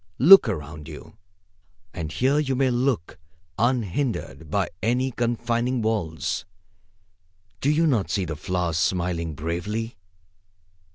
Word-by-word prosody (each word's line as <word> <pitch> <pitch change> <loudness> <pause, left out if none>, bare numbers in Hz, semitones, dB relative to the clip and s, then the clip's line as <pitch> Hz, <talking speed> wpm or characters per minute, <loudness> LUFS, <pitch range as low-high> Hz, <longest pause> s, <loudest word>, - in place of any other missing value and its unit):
Look 170 - +8
around 75 -5 -6
you, - - -11 0.8
as 80 -2 -5
here 135 +4 +2
you 135 -3 0
may 130 0 +2
look, 120 -7 -1 0.4
unhindered 115 - -1
by 95 +3 0
any 125 +3 +1
confining 120 +1 -1
walls. 80 -10 -1 1.2
Do 140 - +1
you 155 +3 +3
not 115 - +1
see 95 +1 0
the 80 -2 -4
flowers 85 +1 -2
smiling 85 -3 -1
bravely? 100 - -4
110 Hz, 115 wpm, -24 LUFS, 85-125 Hz, 1.2 s, Look